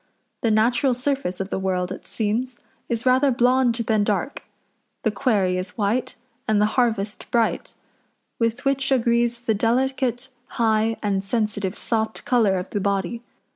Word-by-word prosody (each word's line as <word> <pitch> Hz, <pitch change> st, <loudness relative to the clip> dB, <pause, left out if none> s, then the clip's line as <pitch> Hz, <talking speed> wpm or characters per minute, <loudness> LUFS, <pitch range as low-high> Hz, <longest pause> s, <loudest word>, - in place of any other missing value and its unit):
The 230 Hz, -, +2 dB
natural 240 Hz, +4 st, +3 dB
surface 250 Hz, -7 st, -2 dB
of 195 Hz, +1 st, -4 dB
the -, -, -1 dB
world, 185 Hz, -1 st, -1 dB
it 190 Hz, -, -8 dB
seems, 235 Hz, +3 st, -2 dB, 0.3 s
is 230 Hz, 0 st, -2 dB
rather 260 Hz, +2 st, +4 dB
blond 250 Hz, -1 st, +3 dB
than 220 Hz, -3 st, +1 dB
dark; 205 Hz, +7 st, -1 dB, 0.6 s
the 220 Hz, -, +2 dB
quarry 205 Hz, -7 st, +1 dB
is 185 Hz, 0 st, -7 dB
white, 220 Hz, +4 st, 0 dB, 0.3 s
and 215 Hz, -1 st, +3 dB
the 210 Hz, -, +4 dB
harvest 220 Hz, -5 st, 0 dB
bright; 230 Hz, -2 st, 0 dB, 0.6 s
with 230 Hz, +2 st, -1 dB
which 275 Hz, 0 st, +1 dB
agrees 235 Hz, -1 st, +2 dB
the 230 Hz, -2 st, +1 dB
delicate, 250 Hz, +3 st, 0 dB, 0.3 s
high, 225 Hz, -1 st, +2 dB
and 195 Hz, -2 st, 0 dB
sensitive 205 Hz, -2 st, -2 dB
soft 220 Hz, -1 st, -2 dB
colour 220 Hz, -6 st, +3 dB
of 180 Hz, +1 st, -5 dB
the 205 Hz, -, -1 dB
body. 200 Hz, +3 st, -1 dB
225 Hz, 150 wpm, -23 LUFS, 205-245 Hz, 0.6 s, rather